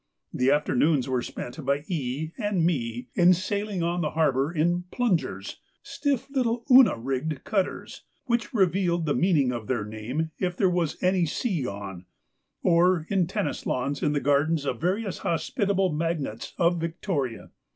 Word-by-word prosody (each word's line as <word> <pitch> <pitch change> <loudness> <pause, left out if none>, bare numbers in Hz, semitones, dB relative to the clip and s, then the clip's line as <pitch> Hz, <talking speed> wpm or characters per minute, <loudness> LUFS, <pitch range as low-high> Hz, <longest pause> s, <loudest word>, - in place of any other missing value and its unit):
The 125 +1 +2
afternoons 145 -1 +2
were 130 -2 0
spent 125 +5 -7
by 140 +2 0
E. 150 -1 -3
and 205 -6 +1
me 125 -6 -2
in 180 +1 +5
sailing 200 0 -2
on 175 +1 0
the 155 - 0
harbour 145 -2 +1
in 175 +2 0
'plungers,' 225 -9 -1 0.3
stiff 280 -4 -1
little 240 -4 0
Una 255 - +7
rigged 135 +4 -3
cutters, 195 -3 -2 0.2
which 235 -4 0
revealed 180 -4 +1
the 145 - +1
meaning 155 -8 +2
of 115 -4 -5
their 120 -5 -1
name 120 +10 -4
if 180 -1 -1
there 190 -2 +3
was 175 -3 0
any 180 -2 +3
sea 170 - -1
on, 95 -3 -7 0.6
or 175 -1 +3
in 195 - +1
lawn 175 - +2
tennis 145 - -2
in 150 - +1
the 145 - +1
gardens 145 +2 +1
of 125 -2 -2
various 190 +3 -1
hospitable 195 - 0
magnates 150 -8 -3
of 170 0 +2
Victoria. 165 - -3
165 Hz, 155 wpm, -26 LUFS, 135-185 Hz, 0.6 s, Una